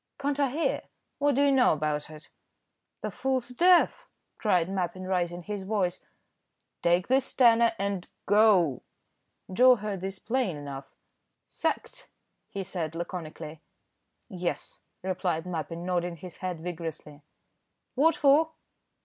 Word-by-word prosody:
"Can't 285 Hz, 0 st, -1 dB
I 280 Hz, -2 st, +3 dB
hear? 310 Hz, +6 st, 0 dB, 0.4 s
what 285 Hz, -1 st, +2 dB
do 280 Hz, -, +3 dB
you 280 Hz, -, +4 dB
know 260 Hz, -2 st, +5 dB
about 150 Hz, -1 st, -2 dB
it?" 155 Hz, 0 st, -11 dB, 0.7 s
"The -, -, -3 dB
fool's 260 Hz, -2 st, -1 dB
deaf," 360 Hz, -, +4 dB, 0.3 s
cried 180 Hz, -6 st, +2 dB
Mappin, 185 Hz, -1 st, -3 dB
raising 175 Hz, -2 st, -1 dB
his 205 Hz, +2 st, -4 dB
voice. 190 Hz, -3 st, -1 dB, 0.8 s
"Take 175 Hz, +2 st, +2 dB
this 265 Hz, +1 st, +2 dB
tenner 235 Hz, -2 st, +5 dB
and 200 Hz, -2 st, -2 dB, 0.2 s
go." 195 Hz, -, +4 dB, 0.7 s
Joe 250 Hz, +5 st, +7 dB
heard 210 Hz, -4 st, -4 dB
this 190 Hz, 0 st, -4 dB
plain 230 Hz, -, -1 dB
enough. 140 Hz, -1 st, -8 dB, 0.5 s
"Sacked!" -, -, -3 dB, 0.4 s
he 195 Hz, -, -4 dB
said, 170 Hz, -4 st, -4 dB
laconically. 165 Hz, -2 st, -6 dB, 0.7 s
"Yes," 180 Hz, -5 st, -4 dB, 0.2 s
replied 180 Hz, -3 st, -1 dB
Mappin, 170 Hz, -1 st, -4 dB
nodding 175 Hz, -1 st, -1 dB
his 180 Hz, +1 st, -10 dB
head 180 Hz, -4 st, -4 dB
vigorously. 160 Hz, -4 st, -6 dB, 0.7 s
"What 315 Hz, +5 st, +4 dB
for?" 300 Hz, +3 st, +4 dB
185 Hz, 125 wpm, -28 LUFS, 170-245 Hz, 0.8 s, Joe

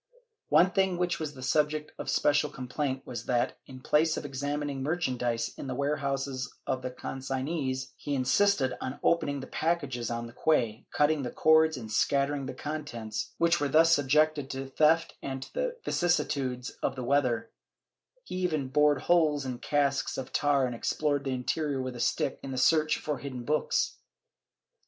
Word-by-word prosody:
One 180 Hz, +2 st, +5 dB
thing 190 Hz, -2 st, +1 dB
which 180 Hz, 0 st, 0 dB
was 150 Hz, -2 st, -4 dB
the 130 Hz, -, -9 dB
subject 150 Hz, +3 st, +1 dB
of -, -, -5 dB
especial 145 Hz, 0 st, +2 dB
complaint 130 Hz, 0 st, -3 dB
was 120 Hz, -2 st, -6 dB
that, 120 Hz, -1 st, 0 dB
in 130 Hz, -1 st, -11 dB
place 155 Hz, +4 st, +2 dB
of -, -, -4 dB
examining 145 Hz, 0 st, -3 dB
merchandise 125 Hz, -7 st, -1 dB
in -, -, -5 dB
the 130 Hz, -, -3 dB
warehouses 140 Hz, -2 st, -2 dB
of 130 Hz, -, -1 dB
the 130 Hz, -, -3 dB
consignees, 130 Hz, +1 st, -3 dB
he 145 Hz, -, -3 dB
insisted 135 Hz, +1 st, +2 dB
on 130 Hz, +1 st, -4 dB
opening 145 Hz, -4 st, +1 dB
the -, -, -6 dB
packages 145 Hz, -7 st, -1 dB
on 120 Hz, 0 st, -3 dB
the 115 Hz, -, -11 dB
quay, 120 Hz, -7 st, +1 dB
cutting 150 Hz, 0 st, +2 dB
the 125 Hz, -, -3 dB
cords 160 Hz, +1 st, +4 dB
and 110 Hz, -3 st, -7 dB
scattering 140 Hz, +4 st, +1 dB
the 130 Hz, -, -6 dB
contents, 130 Hz, -7 st, -5 dB
which 170 Hz, 0 st, +3 dB
were 145 Hz, -, +1 dB
thus 165 Hz, +3 st, +5 dB
subjected 145 Hz, 0 st, +2 dB
to 135 Hz, -1 st, -4 dB
theft 160 Hz, +4 st, +3 dB
and 135 Hz, -1 st, -4 dB
to -, -, -14 dB
the -, -, -2 dB
vicissitudes 135 Hz, -7 st, 0 dB
of -, -, -1 dB
the 130 Hz, -, -5 dB
weather; 125 Hz, -3 st, +1 dB, 0.7 s
he 185 Hz, -, -6 dB
even 155 Hz, -7 st, -1 dB
bored 150 Hz, +1 st, +3 dB
holes 155 Hz, -5 st, +3 dB
in 125 Hz, -2 st, -4 dB
casks 140 Hz, -2 st, 0 dB
of 135 Hz, 0 st, -6 dB
tar 145 Hz, -2 st, +3 dB
and 125 Hz, -, -3 dB
explored 145 Hz, +4 st, -1 dB
the -, -, -1 dB
interior 135 Hz, +2 st, -1 dB
with 130 Hz, -1 st, -4 dB
a -, -, -7 dB
stick 135 Hz, -, 0 dB
in 135 Hz, -, -7 dB
the 130 Hz, -, -4 dB
search 155 Hz, +4 st, +3 dB
for 150 Hz, -3 st, -3 dB
hidden 130 Hz, -3 st, -6 dB
books. 150 Hz, +3 st, 0 dB
140 Hz, 175 wpm, -29 LUFS, 130-155 Hz, 0.7 s, One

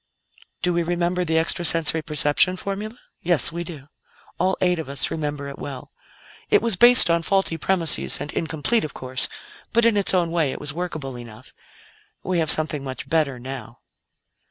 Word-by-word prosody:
"Do 180 Hz, -, +2 dB
we 170 Hz, -, +1 dB
remember 175 Hz, +1 st, -1 dB
the 160 Hz, -2 st, 0 dB
extra 165 Hz, +2 st, 0 dB
sensory 165 Hz, -1 st, +4 dB
perception 150 Hz, +4 st, +1 dB
formula? 205 Hz, +5 st, -5 dB, 0.2 s
Yes, 175 Hz, -2 st, +2 dB
we 170 Hz, +1 st, -4 dB
do; 155 Hz, -6 st, -10 dB, 0.5 s
all 185 Hz, +2 st, +1 dB
eight 180 Hz, -2 st, +1 dB
of 155 Hz, -, -6 dB
us 140 Hz, -, -2 dB
remember 145 Hz, -2 st, -4 dB
it 140 Hz, -, -9 dB
well. 135 Hz, -3 st, -8 dB, 0.6 s
It -, -, +5 dB
was 230 Hz, -4 st, +2 dB
based 240 Hz, +3 st, +7 dB
on 170 Hz, 0 st, +2 dB
faulty 195 Hz, 0 st, +1 dB
premises, 165 Hz, 0 st, +1 dB
and 145 Hz, +2 st, -6 dB
incomplete, 165 Hz, +8 st, 0 dB
of 155 Hz, -, -6 dB
course; 130 Hz, 0 st, -1 dB, 0.4 s
but 235 Hz, 0 st, +4 dB
in 230 Hz, -2 st, +4 dB
its 200 Hz, -1 st, +3 dB
own 170 Hz, -2 st, +1 dB
way 165 Hz, -5 st, +1 dB
it -, -, -7 dB
was 145 Hz, 0 st, -3 dB
workable 155 Hz, -7 st, -5 dB
enough. 115 Hz, 0 st, -12 dB, 0.7 s
We 180 Hz, -1 st, -1 dB
have 160 Hz, -2 st, +1 dB
something 155 Hz, -3 st, +1 dB
much 130 Hz, -2 st, -7 dB
better 150 Hz, -5 st, +1 dB
now." 130 Hz, -1 st, -9 dB
165 Hz, 180 wpm, -23 LUFS, 145-180 Hz, 0.7 s, based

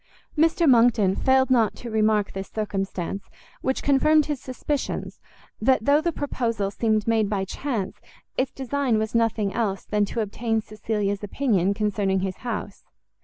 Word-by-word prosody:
Mr 325 Hz, +2 st, +3 dB
Monckton 230 Hz, -6 st, +5 dB
failed 265 Hz, 0 st, +3 dB
not 230 Hz, -4 st, +3 dB
to 235 Hz, -, -8 dB
remark 215 Hz, -1 st, +2 dB
this 195 Hz, 0 st, -5 dB
circumstance, 195 Hz, -3 st, -3 dB, 0.3 s
which 265 Hz, -, -1 dB
confirmed 300 Hz, +2 st, +4 dB
his 290 Hz, -4 st, -3 dB
suspicions, 270 Hz, +2 st, -3 dB, 0.4 s
that 250 Hz, -1 st, +3 dB
though 290 Hz, +2 st, +4 dB
the 340 Hz, +1 st, 0 dB
proposal 230 Hz, -9 st, -2 dB
seemed 215 Hz, 0 st, 0 dB
made 220 Hz, -3 st, +2 dB
by 195 Hz, -2 st, -1 dB
chance, 225 Hz, -2 st, -4 dB, 0.4 s
its 260 Hz, 0 st, 0 dB
design 265 Hz, -2 st, 0 dB
was 220 Hz, +1 st, -2 dB
nothing 225 Hz, -3 st, +1 dB
else 200 Hz, -4 st, -1 dB
than 210 Hz, -1 st, +1 dB
to 225 Hz, -, -3 dB
obtain 225 Hz, +2 st, -1 dB
Cecilia's 210 Hz, -1 st, -3 dB
opinion 200 Hz, -4 st, +1 dB
concerning 200 Hz, -2 st, 0 dB
his 190 Hz, -1 st, -3 dB
house. 220 Hz, -4 st, -5 dB
220 Hz, 150 wpm, -24 LUFS, 205-260 Hz, 0.4 s, Monckton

